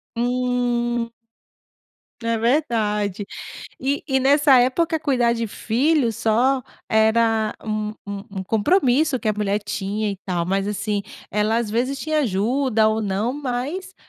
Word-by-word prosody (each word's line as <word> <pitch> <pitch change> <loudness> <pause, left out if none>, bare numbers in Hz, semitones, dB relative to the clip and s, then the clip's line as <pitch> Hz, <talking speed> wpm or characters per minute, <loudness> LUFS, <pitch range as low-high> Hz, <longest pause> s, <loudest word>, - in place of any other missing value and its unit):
Hum. 240 -1 0 1.1
É 230 0 0
verdade, 215 - 0 0.5
e 275 +2 -1
e 265 0 +3
nessa 280 +1 +5
época, 320 +6 +2
cuidar 250 -6 +2
de 230 -1 -2
filhos 240 +2 +1
só 250 +4 +2 0.3
era 220 0 +2
um 215 -1 -2 0.2
um 200 0 -5
um 190 - -2
compromisso 260 - +2
que 220 - -1
a 215 - +3
mulher 205 0 0
tinha 205 +2 -2
e 200 - -5
tal, 175 -3 -1
mas 195 +1 0
assim 205 0 -2 0.3
ela 210 +2 +1
às 225 -3 -2
vezes 255 +5 -1
tinha 310 -1 0
ajuda 225 +1 +2
ou 220 0 0
não, 210 +4 -1
mas 290 +8 -4
230 Hz, 135 wpm, -22 LUFS, 210-265 Hz, 1.1 s, nessa